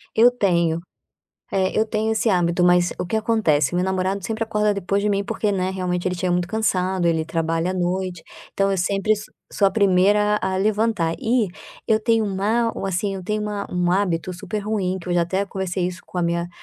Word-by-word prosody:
Eu 230 Hz, +2 st, +7 dB
tenho, 170 Hz, -8 st, +1 dB, 0.7 s
eh, 190 Hz, -1 st, +1 dB
eu 220 Hz, -, +3 dB
tenho 220 Hz, 0 st, -1 dB
esse 220 Hz, +1 st, +1 dB
hábito, 175 Hz, -2 st, +2 dB
mas 175 Hz, 0 st, +4 dB
o -, -, -2 dB
que 175 Hz, -, -4 dB
acontece? 190 Hz, -, +1 dB
Meu 180 Hz, -, +1 dB
namorado 190 Hz, +1 st, -1 dB
sempre 225 Hz, 0 st, -2 dB
acorda 210 Hz, -2 st, +1 dB
depois 200 Hz, +1 st, -1 dB
de 210 Hz, -, 0 dB
mim 200 Hz, -1 st, +1 dB
porque, 205 Hz, +1 st, -1 dB
né, 185 Hz, -1 st, 0 dB
realmente 180 Hz, -1 st, -2 dB
ele 180 Hz, -, -3 dB
chega 180 Hz, 0 st, 0 dB
muito 175 Hz, 0 st, 0 dB
cansado, 190 Hz, -4 st, 0 dB
ele 160 Hz, -1 st, +1 dB
trabalha 165 Hz, +1 st, -1 dB
à 185 Hz, -, -3 dB
noite, 180 Hz, -1 st, -2 dB, 0.3 s
então 195 Hz, 0 st, +1 dB
eu 195 Hz, -, +1 dB
sempre 195 Hz, +3 st, +1 dB
s 210 Hz, -1 st, -2 dB, 0.3 s
sou 200 Hz, -2 st, +3 dB
a -, -, -8 dB
primeira 205 Hz, +1 st, +3 dB
a 190 Hz, 0 st, 0 dB
levantar. 205 Hz, -4 st, +1 dB
E 235 Hz, -2 st, +1 dB, 0.4 s
eu 220 Hz, -2 st, +3 dB
tenho 225 Hz, -1 st, +2 dB
um 190 Hz, -2 st, -3 dB
há 230 Hz, +2 st, +1 dB, 0.2 s
assim 195 Hz, +2 st, -1 dB
eu 190 Hz, -, -6 dB
tenho 210 Hz, +3 st, -2 dB
uma 205 Hz, -1 st, -3 dB
um 180 Hz, 0 st, +1 dB
hábito 185 Hz, -2 st, 0 dB
super 195 Hz, +4 st, -5 dB
ruim 200 Hz, -3 st, -1 dB
que 180 Hz, -, -9 dB
eu 175 Hz, -, 0 dB
já 175 Hz, -, +3 dB
até 190 Hz, +4 st, -1 dB
conversei 185 Hz, -2 st, -2 dB
isso 180 Hz, 0 st, -6 dB
com 180 Hz, -, -6 dB
a -, -, +1 dB
minha 170 Hz, 0 st, -1 dB
190 Hz, 215 wpm, -22 LUFS, 180-210 Hz, 0.7 s, Eu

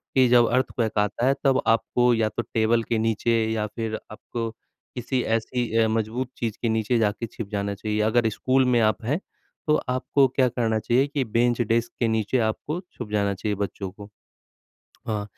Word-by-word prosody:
कि 130 Hz, -1 st, +6 dB
जब 120 Hz, -1 st, +6 dB
अर्थक्वेक 120 Hz, -4 st, 0 dB
आता 105 Hz, +3 st, 0 dB
है 135 Hz, -, +4 dB
तब 135 Hz, -1 st, +3 dB
आपको 120 Hz, +2 st, +3 dB
या 110 Hz, -1 st, +2 dB
तो 120 Hz, -, -3 dB
टेबल 115 Hz, +1 st, +3 dB
के 115 Hz, -, -1 dB
नीचे 115 Hz, +1 st, 0 dB, 0.2 s
या 110 Hz, -1 st, -1 dB
फिर 110 Hz, -1 st, -2 dB, 0.2 s
आपको 115 Hz, +1 st, -5 dB, 0.5 s
किसी 125 Hz, +1 st, -1 dB
ऐसी 115 Hz, +1 st, -1 dB
अ, 110 Hz, -1 st, +4 dB
मजबूत 115 Hz, +3 st, -1 dB
चीज़ 115 Hz, -3 st, -3 dB
के 115 Hz, -, 0 dB
नीचे 110 Hz, +2 st, +1 dB
जाके 110 Hz, +1 st, 0 dB
छिप 115 Hz, -1 st, -7 dB
जाना 100 Hz, -1 st, -2 dB
चाहिए। 105 Hz, +1 st, -2 dB
अगर 115 Hz, +1 st, +2 dB
स्कूल 130 Hz, +4 st, +1 dB
में 125 Hz, -2 st, +3 dB
आप 110 Hz, +1 st, +1 dB
हैं, 145 Hz, +8 st, 0 dB, 0.5 s
तो 150 Hz, -, +4 dB
आपको 130 Hz, +2 st, +2 dB
क्या 130 Hz, 0 st, +2 dB
करना 115 Hz, -2 st, 0 dB
चाहिए 125 Hz, +6 st, +2 dB
कि 145 Hz, -2 st, -1 dB
बेंच-डेस्क 115 Hz, 0 st, +1 dB
के 120 Hz, -, +2 dB
नीचे 110 Hz, +3 st, 0 dB
आपको 155 Hz, +9 st, -4 dB
छुप 120 Hz, -4 st, -8 dB
जाना 100 Hz, -1 st, +1 dB
चाहिए 105 Hz, +2 st, -2 dB
बच्चों 100 Hz, -1 st, -4 dB
को। 100 Hz, +1 st, -11 dB, 0.8 s
अ, 105 Hz, -2 st, -5 dB
115 Hz, 185 wpm, -25 LUFS, 110-125 Hz, 0.8 s, कि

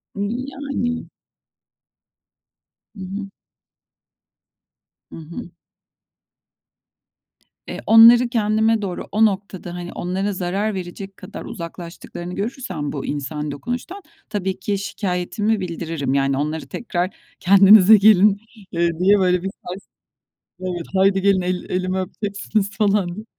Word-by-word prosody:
Iıı, 215 Hz, +6 st, -2 dB
yani. 270 Hz, -4 st, -3 dB, 1.9 s
Hı 200 Hz, -, -12 dB
hı. 195 Hz, +2 st, -5 dB, 1.9 s
Hı -, -, -9 dB
hı. 165 Hz, +2 st, -8 dB, 2.2 s
Eee, -, -, -6 dB
onları 235 Hz, +2 st, +8 dB
kendime 220 Hz, -1 st, +2 dB
doğru, 190 Hz, -3 st, -5 dB
o 220 Hz, +2 st, +4 dB
noktada, 190 Hz, -4 st, -3 dB
hani, 175 Hz, 0 st, -7 dB
onlara 190 Hz, +3 st, -2 dB
zarar 195 Hz, +4 st, -2 dB
verecek 190 Hz, +1 st, -7 dB
kadar -, -, -9 dB
uzaklaştıklarını 175 Hz, -2 st, -8 dB
görürsem 215 Hz, -, -4 dB
bu 140 Hz, -, -5 dB
insani 150 Hz, +1 st, -4 dB
dokunuştan 245 Hz, -, -5 dB, 0.3 s
tabii 190 Hz, -3 st, -3 dB
ki 200 Hz, +1 st, -1 dB
şikayetimi 205 Hz, +2 st, -2 dB
bildiririm, 165 Hz, -6 st, -3 dB
yani, 135 Hz, -1 st, +1 dB
onları 155 Hz, +2 st, -3 dB
tekrar, 180 Hz, -5 st, -3 dB, 0.2 s
"Kendinize 200 Hz, +2 st, +8 dB
gelin.", 205 Hz, 0 st, +5 dB, 0.3 s
eee, 170 Hz, 0 st, +1 dB
diye 200 Hz, +3 st, +4 dB
böyle, 180 Hz, -1 st, +2 dB
bir 195 Hz, -, -2 dB, 0.2 s
sars 185 Hz, +3 st, -7 dB, 0.7 s
Evet, 180 Hz, -2 st, -4 dB
"Haydi 195 Hz, 0 st, +3 dB
gelin 195 Hz, -1 st, +3 dB
el 180 Hz, 0 st, -2 dB
elimi 185 Hz, +1 st, -1 dB
öpeceksiniz." 200 Hz, +1 st, -2 dB
falan 200 Hz, -3 st, +1 dB
diye. 215 Hz, +3 st, -8 dB
195 Hz, 115 wpm, -21 LUFS, 175-210 Hz, 2.2 s, onları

